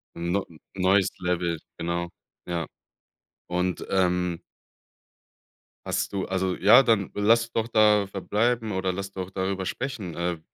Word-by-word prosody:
'N 85 Hz, +1 st, -3 dB
neu 100 Hz, -, +1 dB
'n 80 Hz, -, -16 dB, 0.3 s
neues 95 Hz, 0 st, +4 dB
Level, 90 Hz, -2 st, -1 dB, 0.2 s
genau. 85 Hz, +1 st, -2 dB, 0.4 s
Ja. 85 Hz, -3 st, -3 dB, 0.8 s
Und, 90 Hz, +1 st, -1 dB
ähm 90 Hz, -2 st, +1 dB, 1.5 s
hast -, -, -2 dB
du 95 Hz, -, -1 dB
also 95 Hz, -1 st, 0 dB
ja, 110 Hz, +7 st, +7 dB
dann 110 Hz, -6 st, +1 dB
lass 115 Hz, +3 st, +3 dB
doch 115 Hz, -1 st, -1 dB
da 105 Hz, -3 st, +4 dB
verbleiben 110 Hz, +4 st, 0 dB
oder 95 Hz, -1 st, -1 dB
lass 100 Hz, +1 st, -5 dB
doch 95 Hz, -1 st, -5 dB
darüber 95 Hz, 0 st, -2 dB
sprechen 110 Hz, -, -4 dB
äh, 85 Hz, -1 st, -2 dB
95 Hz, 135 wpm, -26 LUFS, 90-105 Hz, 1.5 s, ja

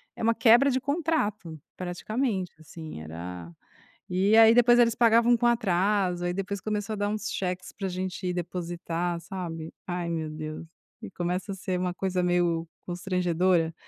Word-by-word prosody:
é -, -, -6 dB
uma 230 Hz, +1 st, +3 dB
quebra 240 Hz, +4 st, +6 dB
de 260 Hz, -1 st, 0 dB
contrato 275 Hz, -, -1 dB, 0.2 s
praticamente, 190 Hz, +2 st, -2 dB
assim, 160 Hz, -, -9 dB
era 85 Hz, +2 st, -7 dB, 0.6 s
e 190 Hz, +4 st, +3 dB
aí 225 Hz, 0 st, +8 dB
depois 240 Hz, 0 st, +6 dB
eles 235 Hz, -1 st, +4 dB
pagavam 235 Hz, +1 st, +5 dB
com 240 Hz, -, 0 dB
atraso, 195 Hz, -5 st, +1 dB
aí 175 Hz, -, 0 dB
depois 195 Hz, +1 st, -3 dB
começou 210 Hz, 0 st, -2 dB
a -, -, -4 dB
dar 205 Hz, 0 st, 0 dB
uns 215 Hz, 0 st, -3 dB
cheques 180 Hz, -1 st, -3 dB
pra 195 Hz, -2 st, -4 dB
gente 185 Hz, 0 st, -3 dB
depositar, 175 Hz, -1 st, -3 dB
sabe, 170 Hz, -3 st, -6 dB, 0.2 s
ai 175 Hz, -1 st, -3 dB
meu 160 Hz, -2 st, -2 dB
Deus. 155 Hz, +1 st, -6 dB, 0.4 s
E 215 Hz, -3 st, -8 dB
começa 180 Hz, +3 st, -3 dB
a -, -, -6 dB
ser 185 Hz, -1 st, -3 dB
uma 180 Hz, -1 st, -1 dB
coisa 185 Hz, -1 st, -1 dB
meio 175 Hz, -2 st, +1 dB, 0.2 s
constrangedora, 180 Hz, -2 st, +1 dB
185 Hz, 160 wpm, -27 LUFS, 175-215 Hz, 0.6 s, aí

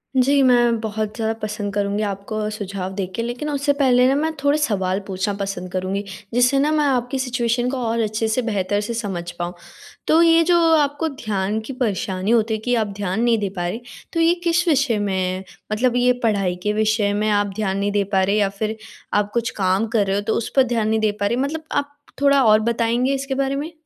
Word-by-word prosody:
जी 275 Hz, +2 st, +4 dB
मैं 240 Hz, -2 st, +4 dB
बहुत 215 Hz, -1 st, -3 dB
ज़्यादा 225 Hz, -1 st, -1 dB
पसंद 210 Hz, -1 st, -4 dB
करूँगी 205 Hz, +1 st, -1 dB
आपको 210 Hz, +2 st, -3 dB
सुझाव 195 Hz, -3 st, -5 dB
दे 195 Hz, -2 st, -1 dB
के 230 Hz, -, -2 dB
लेकिन 245 Hz, +6 st, -4 dB
उससे 285 Hz, 0 st, +1 dB
पहले 250 Hz, -2 st, +4 dB
न -, -, +1 dB
मैं 320 Hz, +2 st, 0 dB
थोड़े 285 Hz, +1 st, +3 dB
सवाल 195 Hz, -9 st, 0 dB
पूछना 190 Hz, +2 st, -2 dB
पसंद 190 Hz, -2 st, -4 dB
करूँगी। 190 Hz, +2 st, -2 dB, 0.3 s
जिससे 250 Hz, +3 st, +3 dB
न 300 Hz, +2 st, +2 dB
मैं 300 Hz, -1 st, +2 dB
आपकी 260 Hz, 0 st, 0 dB
सिचुएशन 245 Hz, -1 st, 0 dB
को 270 Hz, -, -3 dB
और 230 Hz, +1 st, 0 dB
अच्छे 220 Hz, +1 st, -1 dB
से 220 Hz, +3 st, 0 dB
बेहतर 205 Hz, -2 st, -1 dB
से 230 Hz, +3 st, -4 dB
समझ 190 Hz, -6 st, -4 dB
पाऊँ। 175 Hz, +1 st, -3 dB, 0.5 s
तो 320 Hz, +2 st, +5 dB
ये 330 Hz, 0 st, +5 dB
जो 345 Hz, +1 st, +3 dB, 0.2 s
आपको 290 Hz, +1 st, +1 dB
ध्यान 215 Hz, -5 st, -2 dB
की 260 Hz, +5 st, -7 dB
परेशानी 195 Hz, -2 st, -1 dB
होती 225 Hz, -1 st, +2 dB
है 215 Hz, -, -1 dB
कि 245 Hz, 0 st, +2 dB
आप 220 Hz, -2 st, +1 dB
ध्यान 200 Hz, +2 st, -2 dB
नहीं 235 Hz, -2 st, +3 dB
दे 200 Hz, -2 st, -1 dB
पा 175 Hz, 0 st, -1 dB
रही, 225 Hz, +7 st, -4 dB, 0.3 s
तो 330 Hz, -, 0 dB
ये 330 Hz, +1 st, +4 dB
किस 340 Hz, +1 st, +1 dB
विषय 275 Hz, -7 st, +2 dB
में 200 Hz, -2 st, -1 dB
है, 185 Hz, 0 st, -2 dB, 0.3 s
मतलब 245 Hz, +3 st, +1 dB
ये 250 Hz, 0 st, +4 dB
पढ़ाई 195 Hz, -5 st, +1 dB
के 210 Hz, 0 st, +1 dB
विषय 215 Hz, -1 st, +1 dB
में 215 Hz, +1 st, 0 dB
आप 205 Hz, 0 st, +2 dB
ध्यान 195 Hz, -3 st, -1 dB
नहीं 200 Hz, +1 st, 0 dB
दे 205 Hz, -1 st, +1 dB
पा 190 Hz, -, +4 dB
रहे 200 Hz, +2 st, +1 dB
या 200 Hz, -2 st, +2 dB
फ़िर 220 Hz, +1 st, -2 dB, 0.4 s
आप 205 Hz, 0 st, +1 dB
कुछ 235 Hz, +1 st, 0 dB
काम 190 Hz, +3 st, +1 dB
कर 215 Hz, -3 st, +1 dB
रहे 195 Hz, -, +1 dB
हो 205 Hz, -, 0 dB
तो -, -, +2 dB
उस 230 Hz, -, -3 dB
पर 265 Hz, -, +6 dB
ध्यान 220 Hz, -2 st, +1 dB
नहीं 220 Hz, 0 st, +2 dB
दे 215 Hz, -1 st, +2 dB
पा 200 Hz, -, +1 dB
रहे 235 Hz, -, 0 dB
मतलब 310 Hz, +3 st, -3 dB
आप 285 Hz, 0 st, -1 dB, 0.3 s
थोड़ा 280 Hz, -1 st, +5 dB
और 215 Hz, -1 st, +6 dB
बताएँगे 235 Hz, +3 st, +1 dB
इसके 275 Hz, 0 st, -3 dB
बारे 275 Hz, 0 st, 0 dB
में? 300 Hz, +4 st, -4 dB
220 Hz, 230 wpm, -21 LUFS, 205-260 Hz, 0.5 s, पर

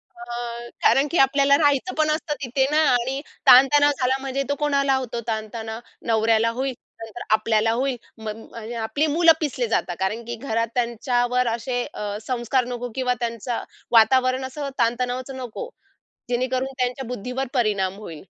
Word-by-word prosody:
अ, 235 Hz, 0 st, -6 dB
कारण 275 Hz, +2 st, +4 dB
की 340 Hz, -, +1 dB
आपल्याला 275 Hz, +1 st, +4 dB
राहायचं 290 Hz, +4 st, +2 dB
पण 310 Hz, 0 st, +2 dB
असतं 305 Hz, -1 st, -2 dB
तिथे 265 Hz, +2 st, +1 dB
ना 305 Hz, -, +2 dB
आणि 255 Hz, +3 st, 0 dB, 0.3 s
ताणतणाव 290 Hz, +3 st, +7 dB
झाला 260 Hz, +1 st, +2 dB
म्हणजे 275 Hz, 0 st, -2 dB
तो 285 Hz, -, +1 dB
कोणाला 280 Hz, -2 st, +2 dB
होतो 245 Hz, -3 st, -3 dB
ताणतणाव? 220 Hz, 0 st, -4 dB, 0.3 s
नवऱ्याला 225 Hz, 0 st, +3 dB
होईल. 265 Hz, -1 st, -1 dB, 0.3 s
नंतर 225 Hz, +2 st, -9 dB
आपल्याला 220 Hz, 0 st, +2 dB
होईल 260 Hz, +1 st, 0 dB, 0.2 s
म 220 Hz, -1 st, -6 dB, 0.2 s
म्हणजे 230 Hz, +1 st, -8 dB
आपली 225 Hz, +7 st, 0 dB
मुलं 330 Hz, +2 st, +5 dB
पिसली 255 Hz, -6 st, -1 dB
जातात 175 Hz, -5 st, -1 dB
कारण 210 Hz, +5 st, -1 dB
की 235 Hz, +1 st, -4 dB
घरात 230 Hz, -2 st, -1 dB
त्यांच्यावर 245 Hz, +1 st, +1 dB
असे 235 Hz, +2 st, -1 dB
अ, 205 Hz, 0 st, -4 dB
संस्कार 245 Hz, +1 st, 0 dB
नको 245 Hz, 0 st, -5 dB
किंवा 255 Hz, -1 st, +1 dB
त्यांचं 235 Hz, 0 st, -3 dB, 0.3 s
वातावरण 255 Hz, +3 st, +4 dB
असं 280 Hz, +2 st, -5 dB
ताणतणावाचं 250 Hz, +3 st, -1 dB
नको. 255 Hz, -, -6 dB, 0.6 s
जेणेकरून 255 Hz, +2 st, -1 dB
त्यांच्या 250 Hz, +1 st, -1 dB
बुद्धीवर 250 Hz, +3 st, -4 dB
परिणाम 205 Hz, -6 st, +1 dB
होईल. 165 Hz, -7 st, -9 dB
245 Hz, 155 wpm, -23 LUFS, 230-270 Hz, 0.6 s, ताणतणाव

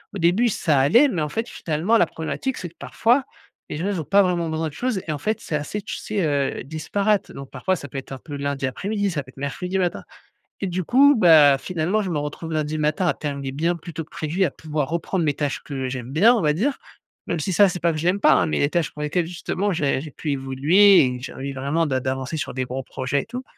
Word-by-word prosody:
Au -, -, -2 dB
début, 185 Hz, +8 st, +3 dB
ça 155 Hz, -8 st, +1 dB
allait 230 Hz, -, +5 dB
mais, 180 Hz, -, -2 dB
en 150 Hz, -, -1 dB
fait, 225 Hz, +8 st, -3 dB
finalement, 170 Hz, +9 st, 0 dB
la 170 Hz, -, +3 dB
problématique 255 Hz, +11 st, -4 dB
c'est 175 Hz, -, -6 dB
que 170 Hz, -, -28 dB
parfois, 245 Hz, +4 st, +1 dB, 0.5 s
les 150 Hz, -, -3 dB
gens, 170 Hz, -, -3 dB
ils 190 Hz, -5 st, -1 dB
ont -, -, -5 dB
pas 200 Hz, +5 st, +4 dB
vraiment 170 Hz, -3 st, 0 dB
besoin 160 Hz, 0 st, -1 dB
de -, -, -16 dB
choses 245 Hz, 0 st, -1 dB
et -, -, -1 dB
en 145 Hz, -, -3 dB
fait, 215 Hz, +4 st, -1 dB
c'est 150 Hz, -, -3 dB
assez, 150 Hz, +8 st, -3 dB
tu -, -, -5 dB
sais, 205 Hz, -5 st, -2 dB
heu, 140 Hz, -4 st, -1 dB
disparate, 195 Hz, -, -1 dB
donc 135 Hz, -1 st, -9 dB
parfois 190 Hz, 0 st, -1 dB
ça 145 Hz, -, -8 dB
peut 135 Hz, +1 st, -5 dB
être 135 Hz, -, -13 dB
un 135 Hz, -, -5 dB
peu 145 Hz, +2 st, -9 dB
lundi 140 Hz, -1 st, -2 dB
après-midi, 200 Hz, -, -2 dB
ça 150 Hz, -3 st, -2 dB
peut 130 Hz, -, -15 dB
être 130 Hz, -, -18 dB
mercredi 180 Hz, +7 st, -3 dB
matin 180 Hz, -2 st, -1 dB, 0.6 s
et -, -, 0 dB
du 180 Hz, 0 st, -2 dB
coup, 280 Hz, -, +6 dB
bah, 155 Hz, -8 st, +7 dB
finalement, 180 Hz, +6 st, -1 dB
je 190 Hz, -, -3 dB
me 160 Hz, -, -1 dB
retrouve 150 Hz, +3 st, -5 dB
lundi 155 Hz, 0 st, -1 dB
matin 155 Hz, +5 st, +1 dB
à -, -, +3 dB
terminer 140 Hz, -2 st, -4 dB
bien 165 Hz, +5 st, 0 dB
plus 170 Hz, 0 st, -10 dB
tôt 160 Hz, -, -4 dB
que -, -, -31 dB
prévu, 160 Hz, +5 st, -1 dB
à -, -, -1 dB
pouvoir 150 Hz, -3 st, -3 dB
reprendre 170 Hz, +1 st, -1 dB
mes 145 Hz, -, +2 dB
tâches 145 Hz, -2 st, -2 dB
que 135 Hz, -3 st, -4 dB
j'aime 125 Hz, -1 st, -6 dB
bien, 210 Hz, -, +5 dB
on 225 Hz, -, +1 dB
va 150 Hz, -1 st, +2 dB
dire, 260 Hz, -, 0 dB, 0.5 s
même 170 Hz, -, -1 dB
si 185 Hz, +5 st, -2 dB
ça 195 Hz, +3 st, +6 dB
c'est 180 Hz, -, -4 dB
pas 170 Hz, 0 st, +3 dB
que 155 Hz, -, -4 dB
je 165 Hz, -, -4 dB
l'aime 195 Hz, +3 st, +2 dB
pas, -, -, +6 dB
hein, 160 Hz, -, +3 dB
mais -, -, -1 dB
les 145 Hz, -, +2 dB
tâches 170 Hz, -3 st, 0 dB
pour 150 Hz, -, -6 dB
lesquelles 165 Hz, +3 st, 0 dB
justement 190 Hz, +3 st, -2 dB
j'ai 145 Hz, -5 st, 0 dB
j'ai 155 Hz, -, -8 dB
pu 150 Hz, +1 st, -4 dB
évoluer 145 Hz, +8 st, +5 dB
et 125 Hz, 0 st, -2 dB
j'ai 130 Hz, -, -7 dB
envie 135 Hz, +1 st, -5 dB
vraiment 140 Hz, +5 st, 0 dB
d'a 130 Hz, -3 st, 0 dB
d'avancer 130 Hz, +4 st, -3 dB
sur -, -, -4 dB
des 130 Hz, -, -1 dB
gros 130 Hz, +2 st, -4 dB
projets 130 Hz, +2 st, -2 dB
et -, -, -15 dB
tout 250 Hz, +2 st, -6 dB
160 Hz, 265 wpm, -23 LUFS, 140-190 Hz, 0.6 s, bah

